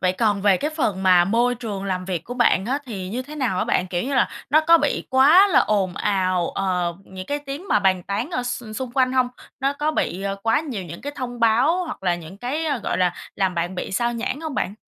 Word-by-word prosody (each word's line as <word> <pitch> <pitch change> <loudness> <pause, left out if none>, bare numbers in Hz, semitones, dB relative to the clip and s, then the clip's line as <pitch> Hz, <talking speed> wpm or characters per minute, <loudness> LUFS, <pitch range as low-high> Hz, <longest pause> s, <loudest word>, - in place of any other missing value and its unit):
Vậy 185 0 +2
còn 205 -1 0
về 200 -3 +5
cái 300 +8 -2
phần 215 - -1
mà 180 -2 +5
môi 235 +5 +2
trường 210 -5 -5
làm 185 -1 -2
việc 180 -3 -3
của 245 - -6
bạn 240 -6 +3
á, 270 +4 0
thì 190 -6 -5
như 245 +6 -3
thế 295 +4 -10
nào 250 -10 -1
á - - +1
bạn? 180 - +1
Kiểu 175 -1 -2
như 275 +2 -2
là - - +3 0.2
nó 305 +3 +6
có 330 +1 +5
bị 290 - -1
quá 305 +10 +6
là 360 - +5
ồn 195 -4 +1
ào, 185 -4 0
ờ, 180 -3 -1
những 185 0 -9
cái 290 - -2
tiếng 290 +6 -7
mà - - +4
bàn 190 -2 +2
tán 210 - -3
ở 250 -7 -1
x 245 0 -4
xung 255 -1 -4
quanh 255 -1 +2
hông? 255 -1 +2 0.3
Nó 275 +2 +1
có 295 +2 -1
bị, 190 - -2
ờ, 195 0 -2
quá 225 +5 +2
nhiều 265 -11 -5
những 170 +1 -9
cái 285 +1 -5
thông 245 -2 -5
báo, 260 +11 +3
hoặc 320 - -7
là 175 -2 +2
những 175 +3 -10
cái, 275 +8 -2
ơ, 285 -4 0
gọi 215 - -2
là, 180 -1 +2 0.2
làm 190 -2 0
bạn 175 +2 -2
bị 180 - -5
xao 240 +4 0
nhãng 255 +5 -3
hông 315 -3 -5
bạn? 200 - -2
225 Hz, 260 wpm, -22 LUFS, 185-275 Hz, 0.3 s, nó